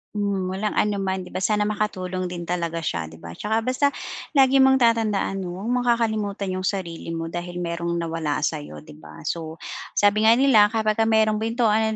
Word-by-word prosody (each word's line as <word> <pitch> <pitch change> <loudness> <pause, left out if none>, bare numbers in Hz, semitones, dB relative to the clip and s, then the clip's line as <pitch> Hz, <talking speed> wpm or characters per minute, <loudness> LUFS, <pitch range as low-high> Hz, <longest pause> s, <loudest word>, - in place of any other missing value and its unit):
Hmm, 200 -3 -1
walang 200 +3 -2
anuman 195 -2 0
'di 180 - -12
ba? - - -3
Sana 210 +2 +1
makatulong 185 -3 -2
din 175 -1 -6
talaga 170 -1 -2
siya, 85 - -2
'di 80 - -12
ba? 80 0 -10
'Tsaka 220 - -1
basta 255 +4 +2 0.5
lagi 270 -1 +5
mong 265 0 +6
tatandaan 220 -4 +1
'no, 180 -2 -5
huwag 205 +6 -4
mong 245 0 0
kakalimutan 215 -4 0
'yung 185 0 -2
sarili 170 -4 -4
mo 165 0 -4
dahil 175 +1 -5
mayro'ng 170 0 -2
nawala 165 -3 -2
sa'yo, 150 -1 -3
'di 155 0 -14
ba? - - -12
So, 160 -1 -4 0.4
sabi 210 +2 +4
nga 225 - +7
nila, 245 -5 +6
kapagka 220 0 +1
mayro'ng 220 -1 +3
pintuan 220 -1 +1
200 Hz, 185 wpm, -23 LUFS, 170-220 Hz, 0.5 s, nga